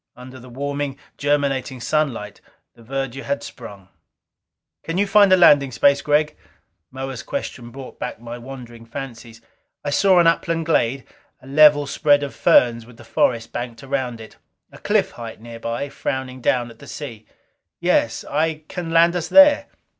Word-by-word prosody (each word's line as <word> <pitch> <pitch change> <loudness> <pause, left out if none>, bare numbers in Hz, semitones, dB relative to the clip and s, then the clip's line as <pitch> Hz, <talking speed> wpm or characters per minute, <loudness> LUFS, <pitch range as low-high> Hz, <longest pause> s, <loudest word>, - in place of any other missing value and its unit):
Under 130 +1 -11
the 125 +1 -13
warming, 140 +2 -4 0.2
germinating 140 -3 -1
sunlight, 120 -7 -2 0.3
the 115 - -20
verdure 135 +2 -4
had 140 - -3
sprung. 100 -6 -11 0.9
"Can 165 +2 -4
you 200 - +3
find 200 0 +5
landing 140 -6 +6
space, 140 +4 +3
Gregg?" 150 +1 +1 0.5
Moa's 135 -1 -6
question 125 - -6
brought 135 +1 -11
back - - -5
my 120 +1 -8
wandering 120 -2 -10
fancies. 115 -2 -9 0.4
I 145 - -1
saw 190 +4 +4
an 175 - +5
upland 165 0 +1
glade, 135 -5 +1 0.3
a 130 - -18
level 145 +1 +5
spread 145 0 +2
of 140 - -5
ferns 115 -2 +3
with 125 -2 -16
the - - -13
forest 115 -2 0
banked 120 -1 -6
around 130 -4 -3
it. 110 - -12 0.3
A - - -14
cliff - - +1
height 115 -2 -9
nearby, 115 +3 -5
frowning 130 -1 -4
down 120 -1 0
at 115 - -18
the - - -13
sea. 115 -7 -8 0.5
"Yes. - - +1
I 160 -1 -1
can 175 -3 -6
land 165 +1 +4
us 170 -2 -2
there." 290 - +6
135 Hz, 160 wpm, -21 LUFS, 120-150 Hz, 0.9 s, landing